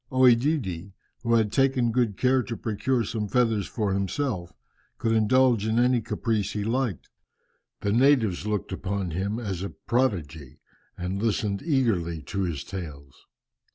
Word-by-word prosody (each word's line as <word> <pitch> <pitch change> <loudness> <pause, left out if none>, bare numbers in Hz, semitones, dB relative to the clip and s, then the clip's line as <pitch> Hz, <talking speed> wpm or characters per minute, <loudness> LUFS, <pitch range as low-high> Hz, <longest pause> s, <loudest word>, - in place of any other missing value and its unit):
OEdidi, 120 - +2 0.3
who 115 -1 +2
had 110 -2 +2
taken 130 -2 +2
good 115 -4 0
care 130 0 +3
to 115 -2 -5
procure 120 +3 0
some 110 0 -3
feathers 115 -4 +1
for 105 -4 -1
himself, 100 -2 -2 0.5
could 115 - 0
indulge 115 0 +3
in 110 +1 +1
any 125 0 +3
caprice 110 -2 -1
he 105 - -2
liked. 115 - -1 0.7
The 100 - 0
natives 115 -7 +3
looked 105 -2 -2
upon 95 -2 -3
him 100 +6 -2
as 100 -7 -4
a 100 - -3
prodigy, 80 - -2 0.4
and 90 +2 -3
listened 105 -2 0
eagerly 105 - 0
to 100 +7 -3
his 85 -6 -2
tales. 75 -8 -9
110 Hz, 145 wpm, -26 LUFS, 95-125 Hz, 0.7 s, care